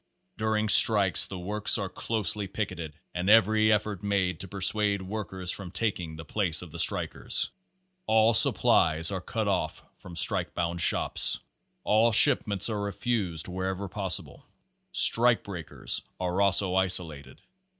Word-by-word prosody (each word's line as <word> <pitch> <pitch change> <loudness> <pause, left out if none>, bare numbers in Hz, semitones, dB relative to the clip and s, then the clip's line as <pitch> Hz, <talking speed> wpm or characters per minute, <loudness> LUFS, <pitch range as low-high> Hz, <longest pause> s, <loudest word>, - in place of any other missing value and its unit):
Page - - -53
Eighteen - - -51
During 110 0 -1
strikes 100 -3 +7
the 95 - -9
works 105 +3 0
are 100 - -4
closely 105 +1 -2
picketed 85 -6 -7 0.2
and 90 +2 -3
every 110 0 +3
effort 105 -2 -2
made 95 -4 -2
to 95 - -8
persuade 100 +1 -1
workers 95 -2 -5
from 95 -3 -6
taking 90 -4 -5
the 80 +1 -11
places 90 -4 -2
of 85 - -13
the 85 - -8
strikers. - - -1 0.6
All 110 +1 +2
supplies 80 -6 +4
are 95 -2 -5
cut 110 +3 -5
off 95 -3 -3
from 90 -2 -13
strike 85 - +2
bound 85 0 -4
shops. - - +1 0.4
All 110 +2 +1
shipments 110 - +3
are 105 -3 -4
refused 100 -5 -4
wher 95 +1 -5
ever 95 +1 -5
possible. 95 -2 -3 0.5
Strike 120 0 +4
breakers 90 -6 -5 0.2
are 90 +1 -3
also 95 -1 +1
isolated. 85 -8 -1
95 Hz, 150 wpm, -26 LUFS, 90-105 Hz, 0.6 s, strikes